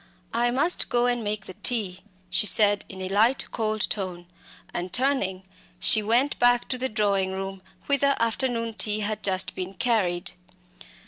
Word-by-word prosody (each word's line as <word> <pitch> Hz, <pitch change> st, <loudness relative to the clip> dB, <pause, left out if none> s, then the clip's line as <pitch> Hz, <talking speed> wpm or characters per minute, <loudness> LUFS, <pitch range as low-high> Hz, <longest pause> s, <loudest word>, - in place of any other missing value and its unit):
"I 240 Hz, +1 st, +2 dB
must 280 Hz, +8 st, +1 dB
go 240 Hz, 0 st, +2 dB
and 245 Hz, -1 st, 0 dB
make 205 Hz, -1 st, -3 dB
the 185 Hz, -, -8 dB
tea," 195 Hz, -3 st, -1 dB, 0.3 s
she 185 Hz, +4 st, +4 dB
said, 205 Hz, 0 st, +4 dB
in 190 Hz, -1 st, -7 dB
a 185 Hz, -, -4 dB
light, 220 Hz, +7 st, +3 dB
cold 215 Hz, -1 st, 0 dB
tone, 185 Hz, -4 st, -4 dB, 0.5 s
and 175 Hz, +1 st, -4 dB
turning, 240 Hz, -8 st, 0 dB, 0.4 s
she 220 Hz, -, +4 dB
went 240 Hz, +7 st, +1 dB
back 245 Hz, 0 st, +4 dB
to 255 Hz, -, -2 dB
the 260 Hz, +1 st, -1 dB
drawing 200 Hz, -3 st, 0 dB
room, 195 Hz, 0 st, -5 dB, 0.2 s
whither 280 Hz, 0 st, +2 dB
afternoon 230 Hz, 0 st, 0 dB
tea 215 Hz, -1 st, +1 dB
had 215 Hz, 0 st, -3 dB
just 190 Hz, -2 st, 0 dB
been 185 Hz, +1 st, -6 dB
carried. 185 Hz, -6 st, 0 dB
215 Hz, 165 wpm, -25 LUFS, 190-245 Hz, 0.5 s, she